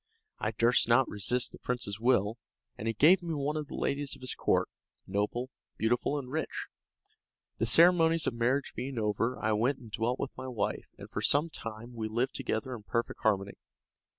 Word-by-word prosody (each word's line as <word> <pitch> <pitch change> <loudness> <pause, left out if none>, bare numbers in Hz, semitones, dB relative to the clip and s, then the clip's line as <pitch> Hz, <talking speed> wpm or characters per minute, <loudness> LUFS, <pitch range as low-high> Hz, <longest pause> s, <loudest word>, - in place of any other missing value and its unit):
I - - 0
durst 115 +3 +3
not 120 +2 +5
resist 120 +5 +1
the - - -12
prince's 115 -5 -2
will, 115 -2 +2 0.4
and 110 - -5
he 115 - +1
gave 170 - +6
me 170 -2 -3
one 145 +1 -1
of 155 -2 -3
the - - -7
ladies 140 0 -1
of - - -17
his 130 - -2
court, - - +1 0.4
noble, 105 +6 -2 0.3
beautiful, 120 +6 +1
and 130 -3 -6
rich. 160 +2 -3 0.9
The 115 - +1
ceremonies 165 +4 +5
of - - 0
marriage 125 +4 0
being 130 +2 -4
over, 110 +3 0
I 110 - 0
went 120 +6 +2
and 115 -3 -13
dwelt 120 +4 0
with 140 - -4
my 130 0 -6
wife 120 -5 -2
and - - -9
for - - -4
some 150 +3 +3
time 115 -1 -7
we 110 -2 -3
lived 120 +5 -1
together 120 +4 -2
in 120 - -7
perfect 115 +3 -2
harmony. 100 -3 +1
120 Hz, 190 wpm, -30 LUFS, 110-140 Hz, 0.9 s, gave